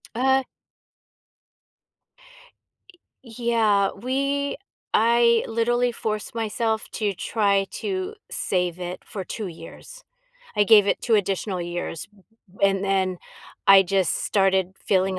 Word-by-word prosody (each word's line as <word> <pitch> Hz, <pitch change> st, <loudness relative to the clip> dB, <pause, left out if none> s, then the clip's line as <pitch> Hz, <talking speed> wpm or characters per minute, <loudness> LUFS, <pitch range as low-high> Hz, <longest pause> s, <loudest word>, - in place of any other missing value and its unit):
Uh 265 Hz, +2 st, +3 dB, 2.8 s
Yeah, 225 Hz, -4 st, +1 dB
we 275 Hz, +5 st, -2 dB, 0.4 s
I 235 Hz, +1 st, +4 dB
literally 240 Hz, +2 st, +1 dB
forced 215 Hz, -2 st, -4 dB
myself 220 Hz, 0 st, -2 dB
to 210 Hz, -2 st, -1 dB
try 200 Hz, 0 st, +1 dB
to 385 Hz, +1 st, -4 dB, 0.2 s
save 180 Hz, -2 st, -1 dB
it 180 Hz, 0 st, -6 dB
for 195 Hz, -, -6 dB
2 210 Hz, +3 st, -5 dB
years. 180 Hz, -, -12 dB, 0.5 s
I 210 Hz, -1 st, +3 dB
gave 210 Hz, -1 st, +6 dB
it -, -, +1 dB
2 230 Hz, -, +1 dB
additional 195 Hz, -2 st, -1 dB
years, 175 Hz, -2 st, -5 dB
b 195 Hz, -, -23 dB, 0.4 s
b 200 Hz, -, +6 dB
and 195 Hz, 0 st, 0 dB
then 190 Hz, -1 st, 0 dB, 0.5 s
I 195 Hz, 0 st, +8 dB
just 190 Hz, -1 st, 0 dB
started 190 Hz, -2 st, +1 dB
feeling 190 Hz, -1 st, 0 dB
210 Hz, 115 wpm, -24 LUFS, 190-235 Hz, 2.8 s, I